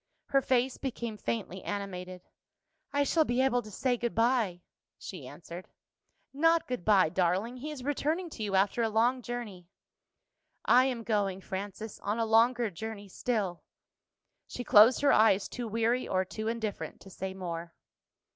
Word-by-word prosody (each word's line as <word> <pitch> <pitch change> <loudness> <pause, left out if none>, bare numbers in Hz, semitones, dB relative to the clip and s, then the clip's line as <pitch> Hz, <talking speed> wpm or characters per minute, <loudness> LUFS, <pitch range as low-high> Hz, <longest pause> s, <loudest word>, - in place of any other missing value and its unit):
Her 275 - +3
face 255 0 +1
became 235 -4 -4
faintly 205 -4 -4
animated. 185 -3 -5 0.7
"I 285 0 +2
shall 320 +3 +3
be 245 -3 -1
able 260 -2 +3
to 215 - -11
say 245 +4 0
good 235 0 -3
bye," 225 -7 +1 0.3
she 160 -9 -8
answered. 170 +5 -10 0.6
"Not 330 +4 +3
good 250 -8 -3
bye, 195 -5 +4
darling. 190 +8 0
He 290 +5 -6
is 295 -4 -7
returning 305 +5 -1
to - - -8
you 205 -2 -1
after 195 +5 +2
a 225 - +2
long 235 +4 +2
journey." 220 -8 -6 1.0
"I 255 +1 +6
am 250 -3 -2
going, 200 -4 0
Frances, 200 +3 -6
on 210 +2 -2
a 230 - +1
longer 230 +1 +3
journey 205 +2 -7
still." 195 -5 -2 0.9
She 245 - -6
closed 225 +4 +6
her 285 - +5
eyes, 210 -2 +4
too 245 -2 -5
weary 230 +3 0
or 185 0 +1
too 215 +4 -5
indifferent 225 -2 -4
to 195 - -13
say 190 +1 -5
more. 170 -2 -6
220 Hz, 160 wpm, -30 LUFS, 190-245 Hz, 1.0 s, I